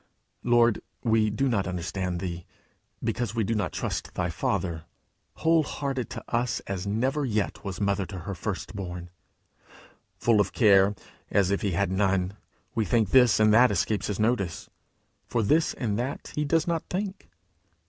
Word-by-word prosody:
Lord, 120 Hz, -2 st, +3 dB, 0.2 s
we 110 Hz, -2 st, +3 dB
do 120 Hz, +6 st, 0 dB
not 100 Hz, -7 st, +1 dB
understand 90 Hz, 0 st, -3 dB
thee, 85 Hz, -2 st, -5 dB, 0.6 s
because 120 Hz, -2 st, -2 dB
we 115 Hz, -, +1 dB
do 115 Hz, -, 0 dB
not 105 Hz, -2 st, -1 dB
trust -, -, -4 dB
thy -, -, -1 dB
Father 80 Hz, -4 st, -2 dB, 0.5 s
whole 165 Hz, 0 st, +3 dB
hearted 135 Hz, -4 st, -3 dB
to -, -, -7 dB
us, 120 Hz, 0 st, 0 dB
as 100 Hz, 0 st, -4 dB
never 130 Hz, +8 st, 0 dB
yet 110 Hz, -6 st, -1 dB
was 95 Hz, -2 st, -5 dB
mother 100 Hz, -2 st, 0 dB
to 95 Hz, -3 st, -7 dB
her 100 Hz, +4 st, -5 dB
first 95 Hz, +3 st, -5 dB
born! 90 Hz, -3 st, -6 dB, 1.1 s
Full 115 Hz, -3 st, +4 dB
of -, -, -2 dB
care, 100 Hz, -3 st, +5 dB, 0.3 s
as 100 Hz, -2 st, +2 dB
if 100 Hz, -, 0 dB
he 100 Hz, -3 st, 0 dB
had 100 Hz, +2 st, +1 dB
none, 95 Hz, -1 st, +1 dB, 0.4 s
we 115 Hz, -, +1 dB
think 110 Hz, -3 st, +1 dB
this 125 Hz, -5 st, +6 dB
and 110 Hz, 0 st, +5 dB
that 120 Hz, +3 st, +7 dB
escapes 100 Hz, +2 st, 0 dB
his 105 Hz, -1 st, -3 dB
notice, 110 Hz, -7 st, 0 dB, 0.6 s
for 115 Hz, -, 0 dB
this 155 Hz, +10 st, +2 dB
and 110 Hz, -4 st, -1 dB
that 130 Hz, +3 st, -4 dB
he 150 Hz, -, -1 dB
does 160 Hz, +2 st, +2 dB
not 170 Hz, -2 st, 0 dB
think! 195 Hz, +1 st, -4 dB
105 Hz, 170 wpm, -27 LUFS, 95-120 Hz, 1.1 s, that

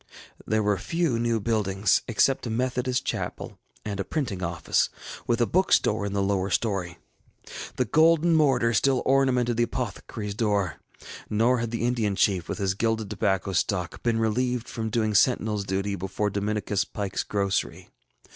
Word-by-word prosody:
There 110 Hz, 0 st, +1 dB
were 105 Hz, -2 st, +1 dB
few 165 Hz, -, 0 dB
new 115 Hz, -1 st, +1 dB
buildings, 100 Hz, -3 st, +1 dB
except 130 Hz, +2 st, +2 dB
a -, -, -3 dB
Methodist 125 Hz, +2 st, -1 dB
chapel -, -, -4 dB, 0.3 s
and 100 Hz, -2 st, -4 dB
a -, -, 0 dB
printing 120 Hz, -, -3 dB
office, 85 Hz, -3 st, 0 dB, 0.4 s
with 120 Hz, 0 st, +1 dB
a -, -, +5 dB
bookstore 110 Hz, -, +2 dB
in 100 Hz, -, -4 dB
the 100 Hz, -1 st, +1 dB
lower 95 Hz, -1 st, 0 dB
story. 95 Hz, -4 st, -1 dB, 0.8 s
The 125 Hz, -, +1 dB
golden 165 Hz, +6 st, +4 dB
mortar 135 Hz, -7 st, +3 dB
still 130 Hz, +5 st, +2 dB
ornamented 130 Hz, -3 st, +2 dB
the 120 Hz, 0 st, +2 dB
apothecaryŌĆÖs 105 Hz, -3 st, -5 dB
door, 100 Hz, -5 st, 0 dB, 0.5 s
nor 115 Hz, +4 st, +2 dB
had 115 Hz, -1 st, -2 dB
the 115 Hz, 0 st, -2 dB
Indian 115 Hz, -5 st, 0 dB
Chief, 95 Hz, -3 st, +1 dB
with -, -, -3 dB
his 100 Hz, -2 st, 0 dB
gilded 110 Hz, 0 st, -1 dB
tobacco 100 Hz, -2 st, 0 dB
stalk, 90 Hz, 0 st, -1 dB
been 115 Hz, -1 st, +1 dB
relieved 120 Hz, +2 st, 0 dB
from 110 Hz, -1 st, -4 dB
doing 110 Hz, -1 st, 0 dB
sentinelŌĆÖs 105 Hz, -3 st, +2 dB
duty 100 Hz, +1 st, -1 dB
before 100 Hz, +2 st, -2 dB
Dominicus 105 Hz, 0 st, -1 dB
PikeŌĆÖs 100 Hz, -2 st, -4 dB
grocery. 100 Hz, -2 st, -2 dB
110 Hz, 155 wpm, -26 LUFS, 100-120 Hz, 0.8 s, a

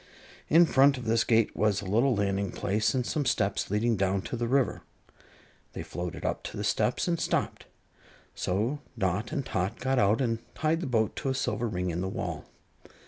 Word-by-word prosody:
In 170 Hz, +3 st, +7 dB
front 140 Hz, -2 st, +4 dB
of 125 Hz, -, -7 dB
this 115 Hz, 0 st, +2 dB
gate 115 Hz, -2 st, +2 dB
was 105 Hz, -2 st, +2 dB
a -, -, -7 dB
little 115 Hz, +7 st, +2 dB
landing 100 Hz, -1 st, 0 dB
place 105 Hz, +7 st, 0 dB
and 125 Hz, -2 st, 0 dB
some 150 Hz, -, -1 dB
steps 100 Hz, -6 st, 0 dB
leading 110 Hz, +3 st, +1 dB
down 95 Hz, 0 st, 0 dB
to -, -, -4 dB
the 120 Hz, 0 st, -2 dB
river. 135 Hz, +1 st, +1 dB, 0.9 s
They -, -, -5 dB
floated 90 Hz, -1 st, -6 dB
up -, -, -1 dB
to -, -, -6 dB
the -, -, -3 dB
steps -, -, +1 dB
and 170 Hz, -1 st, 0 dB
stopped, -, -, -1 dB, 0.7 s
so 110 Hz, +10 st, -1 dB, 0.2 s
Dot 95 Hz, -, -1 dB
and 140 Hz, -5 st, -2 dB
Tot 95 Hz, +4 st, -2 dB
got 130 Hz, 0 st, +1 dB
out 105 Hz, 0 st, +3 dB
and 115 Hz, -4 st, 0 dB, 0.2 s
tied 160 Hz, +2 st, 0 dB
the 165 Hz, -, -3 dB
boat 110 Hz, -4 st, +1 dB
to 135 Hz, -, -2 dB
a 130 Hz, -, 0 dB
silver 120 Hz, -2 st, -1 dB
ring 90 Hz, -4 st, -2 dB
in 85 Hz, +2 st, -3 dB
the 95 Hz, -, -2 dB
wall. -, -, -4 dB
115 Hz, 195 wpm, -28 LUFS, 100-130 Hz, 0.9 s, In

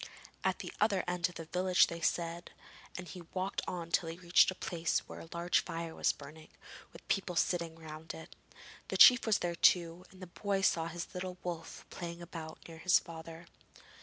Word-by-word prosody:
'At -, -, +1 dB
the -, -, -7 dB
other 205 Hz, -3 st, +3 dB
end 175 Hz, -1 st, 0 dB
of 175 Hz, -, -14 dB
the 165 Hz, -, -6 dB
village,' 180 Hz, +2 st, +4 dB
they 170 Hz, 0 st, -7 dB
said, 170 Hz, +1 st, -1 dB, 0.5 s
and 180 Hz, -1 st, -7 dB
he 180 Hz, -, -8 dB
walked 190 Hz, +1 st, -1 dB
on 170 Hz, -2 st, -4 dB
till 165 Hz, -1 st, +2 dB
he 165 Hz, -, -6 dB
reached 175 Hz, -1 st, +5 dB
a 185 Hz, -, -3 dB
place 170 Hz, -2 st, -1 dB
where -, -, -8 dB
a 165 Hz, -, -11 dB
large 170 Hz, +1 st, +2 dB
fire 165 Hz, -1 st, -5 dB
was -, -, +2 dB
burning, 155 Hz, +2 st, -12 dB, 0.4 s
with -, -, -15 dB
people 190 Hz, -3 st, 0 dB
sitting 170 Hz, 0 st, 0 dB
round 160 Hz, 0 st, -8 dB
it. 160 Hz, -, -11 dB, 0.5 s
The -, -, -2 dB
chief 250 Hz, -2 st, +9 dB
was 215 Hz, -, +4 dB
there 175 Hz, -1 st, -2 dB
too, 170 Hz, 0 st, +3 dB
and 185 Hz, -, -17 dB
the 185 Hz, -, -7 dB
boy 195 Hz, +2 st, -2 dB
saw 165 Hz, -3 st, +2 dB
his 170 Hz, +1 st, -6 dB
little 180 Hz, 0 st, -5 dB
wolf 170 Hz, -2 st, -6 dB
playing 170 Hz, -1 st, -6 dB
about 165 Hz, -2 st, -8 dB
near 165 Hz, -1 st, -10 dB
his 180 Hz, +1 st, +5 dB
father. 165 Hz, 0 st, -8 dB
170 Hz, 195 wpm, -33 LUFS, 165-180 Hz, 0.5 s, chief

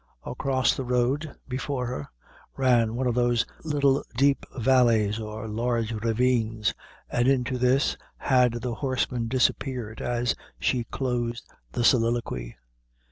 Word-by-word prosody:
Across 130 Hz, -2 st, +1 dB
the 135 Hz, -, -3 dB
road, 125 Hz, +5 st, 0 dB, 0.2 s
before 130 Hz, 0 st, -2 dB
her, 95 Hz, -, -4 dB, 0.5 s
ran 120 Hz, -4 st, +3 dB
one 130 Hz, +2 st, -1 dB
of 125 Hz, -, +1 dB
those 120 Hz, -1 st, +2 dB, 0.2 s
little 140 Hz, -3 st, +2 dB
deep 140 Hz, +2 st, +2 dB
valleys, 115 Hz, -4 st, +3 dB
or 110 Hz, 0 st, -6 dB
large 115 Hz, +1 st, -1 dB
ravines, 115 Hz, -1 st, +1 dB, 0.4 s
and 120 Hz, +1 st, +2 dB
into 130 Hz, -1 st, +1 dB
this 130 Hz, +3 st, +3 dB, 0.2 s
had 125 Hz, -3 st, +2 dB
the 125 Hz, -2 st, -2 dB
horseman 125 Hz, -1 st, -1 dB
disappeared 125 Hz, -2 st, 0 dB
as 120 Hz, 0 st, 0 dB, 0.3 s
she 120 Hz, -3 st, 0 dB
closed 120 Hz, -2 st, -3 dB, 0.3 s
the 120 Hz, -, -1 dB
soliloquy. 115 Hz, -, +1 dB
120 Hz, 125 wpm, -26 LUFS, 115-130 Hz, 0.5 s, ran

